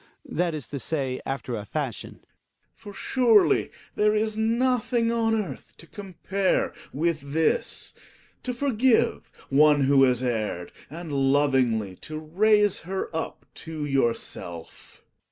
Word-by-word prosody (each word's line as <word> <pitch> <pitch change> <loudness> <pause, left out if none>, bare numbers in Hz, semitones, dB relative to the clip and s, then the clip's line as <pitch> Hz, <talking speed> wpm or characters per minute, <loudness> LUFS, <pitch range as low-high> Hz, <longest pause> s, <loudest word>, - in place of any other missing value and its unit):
That 170 -1 -1
is 145 -7 -6
to 140 - -5
say, 135 -3 -2
after 135 -3 -3
a 105 - -5
fashion. 130 +1 -5
Gregers. - - -35 0.5
For 205 - -11
surely 235 -3 +3 0.2
there 210 0 +2
is 215 0 0
nothing 235 +1 +1
on 225 -1 +1
earth 210 -4 -5
to - - -14
compare 190 +1 -2 0.2
with 150 -2 -2
this, 160 - 0 0.5
to 255 - -3
forgive 245 -2 +1 0.2
one 145 +1 +5
who 135 0 +4
has 130 -1 +3
erred, 110 -7 -2 0.2
and 160 +1 -7
lovingly 135 -8 +2
to 155 - -7
raise 205 +6 +2
her 190 -1 -5
up 160 - -4
to 160 -2 -6
yourself. 115 - -3
160 Hz, 130 wpm, -25 LUFS, 135-215 Hz, 0.5 s, one